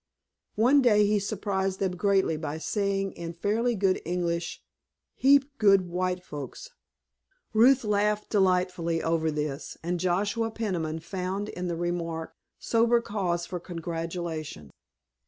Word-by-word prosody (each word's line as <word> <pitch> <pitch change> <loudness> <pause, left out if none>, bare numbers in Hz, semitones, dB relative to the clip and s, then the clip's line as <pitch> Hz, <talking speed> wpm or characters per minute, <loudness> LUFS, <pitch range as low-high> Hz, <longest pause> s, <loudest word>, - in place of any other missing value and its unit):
One 255 +6 +5
day 210 -5 +5
he 210 0 +2
surprised 195 -2 -2
them 190 -2 -1
greatly 195 -3 +2
by 155 -1 -4
saying 195 +2 -1
in 170 -1 -7
fairly 220 +7 0
good 190 -2 +1
English: 170 -1 -2 0.5
"Heap 280 +1 +4
good 195 -4 +5
white 180 +1 -1
folks." 150 - -8 0.8
Ruth 250 +4 +5
laughed 210 0 0
delightedly 180 -4 +2
oven 160 -1 0
this, 150 -1 -4
and 175 +1 -1
Joshua 205 +6 0
Peniman 175 -8 -3
found 190 +4 -3
in 180 0 -4
the 170 -1 -2
remark 170 -1 -3 0.2
sober 235 +1 +3
cause 185 -6 -2
for 180 0 -5
congratulation. 165 - -5
185 Hz, 125 wpm, -27 LUFS, 170-210 Hz, 0.8 s, One